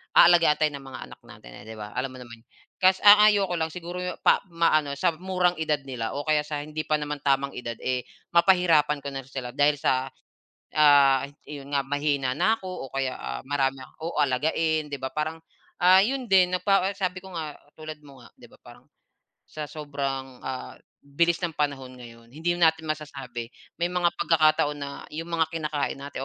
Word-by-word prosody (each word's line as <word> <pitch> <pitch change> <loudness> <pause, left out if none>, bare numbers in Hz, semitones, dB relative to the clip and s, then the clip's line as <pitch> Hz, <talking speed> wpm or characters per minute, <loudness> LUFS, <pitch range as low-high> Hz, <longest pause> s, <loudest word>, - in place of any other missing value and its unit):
aalagaan 170 -3 +7
tayo 150 0 +1
ng 140 -1 -9
mga 130 - -8
anak - - -13
natin - - -14
eh, - - -12
'di 110 - -8
ba, 105 -1 -8
alam 130 +4 -2
mo - - -10
naman. 115 -1 -13 0.4
Kas 185 0 +3
ang 205 0 +9
ayoko 200 -3 +2
lang 160 - 0
siguro 180 0 -6
'yong 180 0 -5
pa - - +5
ma-ano 155 -4 +1
sa 155 - +1
murang 180 0 0
edad 150 -2 0
nila 120 -4 -5
o 145 - -3
kaya 150 -1 +1
sa 150 -1 -4
hindi 155 +1 -5
pa 155 - +2
naman 150 0 -3
tamang 140 0 +1
edad 120 -1 -6
eh, 125 -1 -1 0.3
ma-pahirapan 170 -5 +3
ko 140 - -4
na 135 -1 -6
sila 130 -2 -6
dahil 145 +3 +3
sa, 130 -2 0 0.7
ah, 140 -3 +5 0.2
'yon 145 -1 -9
nga, 140 - +2
mahina 140 -2 -1
na 215 +6 +3
ko 185 -7 -6
o - - -22
kaya, 135 -1 -2
ah, 65 0 -5
marami 135 -1 -1 0.2
oo, 165 +2 -5
alagain 155 +3 0
'di 145 - -5
ba 130 - -3
parang 155 +2 -3 0.4
ah, 185 +1 +8
'yon 265 +2 -2
din 185 -2 +4
na 180 - -3
pa 195 -2 +3
sabi 185 -2 -2
ko 190 0 -13
nga, 155 -2 -4 0.2
tulad 155 -1 -8
mo 135 -3 -15
nga, - - -15
'di - - -14
ba - - -19
parang, - - -15 0.6
sa 150 -1 -7
sobrang, 135 -3 -5
ah, 130 -1 -6 0.3
bilis 170 +4 +1
ng 175 -3 -3
panahon 140 -4 -3
ngayon, 115 -2 -13
hindi 175 +2 -1
natin 160 -1 +3
masasabi, 140 -6 -5 0.3
may 175 - +1
mga 175 -1 +1
pag-kakataon 155 -2 +3
na 140 -1 -6 0.2
yung 165 +2 -6
mga 165 -1 +1
kina-kain 150 -3 -2
natin 140 -1 -7
150 Hz, 195 wpm, -26 LUFS, 135-170 Hz, 0.7 s, ang